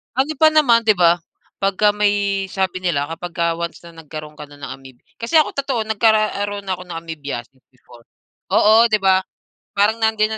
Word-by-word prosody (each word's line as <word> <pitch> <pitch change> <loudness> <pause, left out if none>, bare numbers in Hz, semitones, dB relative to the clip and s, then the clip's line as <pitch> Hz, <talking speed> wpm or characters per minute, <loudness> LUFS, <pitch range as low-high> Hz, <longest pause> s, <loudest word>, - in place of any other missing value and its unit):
Ano 285 +4 0
pa 310 +2 +5
naman, 245 -7 +4
'di 220 - +5
ba? 175 0 +4 0.4
Pagka 200 +1 +2
may 205 -1 +1
sabi 185 -1 -2
nila 145 -5 0
kapag 170 +2 -7
ka 170 - +1
once 170 0 -5
na 170 -1 -13
nagkaro'n 155 0 -9
ka 150 - -9
na 145 - -15
ng 135 - -7
amoeb 130 -2 -16 0.2
kasi 240 +8 +2
ako 305 - 0
totoo 275 -4 -2
nagkaroon 215 -2 +1
ako 185 -1 -3
ng 175 -2 -7
amoebiasis 140 -6 -8
before. 120 -2 -19 0.5
Oo, 225 +2 +5
'di 215 - +4
ba? 190 -1 +3 0.5
Parang 205 +3 +2
nandiyan 220 -1 +1
195 Hz, 180 wpm, -19 LUFS, 165-220 Hz, 0.5 s, pa